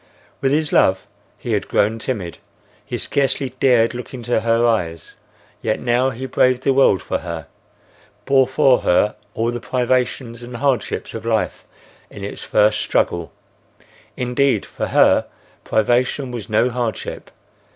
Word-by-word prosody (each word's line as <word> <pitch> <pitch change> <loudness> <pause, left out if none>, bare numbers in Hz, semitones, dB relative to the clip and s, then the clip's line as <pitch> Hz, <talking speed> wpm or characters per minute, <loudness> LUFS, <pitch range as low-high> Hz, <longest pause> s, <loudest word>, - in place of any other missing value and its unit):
With 135 0 +1
his 150 +1 0
love 95 0 +3 0.3
he - - -4
had - - -1
grown 110 +2 +1
timid; 105 -8 -4 0.4
he - - -4
scarcely 135 -1 0
dared 120 -3 +4
look 125 +2 -7
into 120 -2 -1
her 115 +1 +2
eyes; 85 -9 -1 0.4
yet 110 - -1
now 125 +2 +1
he 130 +1 -6
braved 130 0 +2
the 135 - +3
world 130 -8 +4
for - - -2
her; 85 -3 -6 0.8
bore 135 -1 +4
for 130 -1 +4
her 105 +4 +2 0.2
all 115 +1 0
the 120 - -4
privations 125 -1 -1
and 120 0 -8
hardships 130 -4 -1
of - - -6
life - - -1 0.5
in - - -10
its - - -6
first 105 0 +3
struggle. 85 -1 0 0.9
Indeed, 125 -2 +1
for - - -4
her, - - +4 0.4
privation 125 +4 +1
was 115 -4 -6
no 115 +4 +2
hardship. 120 -4 -4
120 Hz, 145 wpm, -20 LUFS, 110-130 Hz, 0.9 s, dared